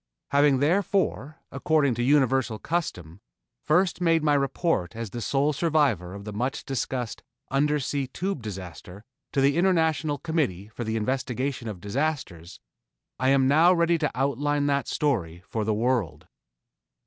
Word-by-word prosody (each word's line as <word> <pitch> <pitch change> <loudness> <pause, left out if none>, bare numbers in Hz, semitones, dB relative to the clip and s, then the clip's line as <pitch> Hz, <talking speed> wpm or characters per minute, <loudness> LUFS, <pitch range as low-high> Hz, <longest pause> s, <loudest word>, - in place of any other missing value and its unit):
Having 140 -1 +4
therefore, 175 -2 0
according 155 -6 +2
to 120 - -3
universal 130 -3 +2
custom, 100 - -4 0.4
first 175 +4 +1
made 165 -2 +3
my 150 -1 +3
report 140 - 0
as 115 -3 -5
the 120 - -5
sole 140 +6 +1
survivor 140 - +1
of 100 - -8
the 105 - -6
much 125 +6 -3
discussed 130 -3 -3 0.3
Undersea 140 -1 0
Tube 185 +2 -3
disaster 95 -2 -8 0.3
to 135 - +1
the 140 +3 +3
International 160 -4 +2
Committee 140 - -2
for 115 +2 -6
the 110 0 -2
Investigation 130 +2 -2
of 105 -4 -6
Disasters, 100 - -3 0.6
I 130 +1 +2
am 135 -1 +4
now 165 +6 +5
ready 170 0 +2
to 150 - +1
outline 145 +2 0
that 140 -3 0
story 90 - -1
for 110 - -2
the 110 +1 0
world. 115 - -1
135 Hz, 145 wpm, -26 LUFS, 110-150 Hz, 0.6 s, now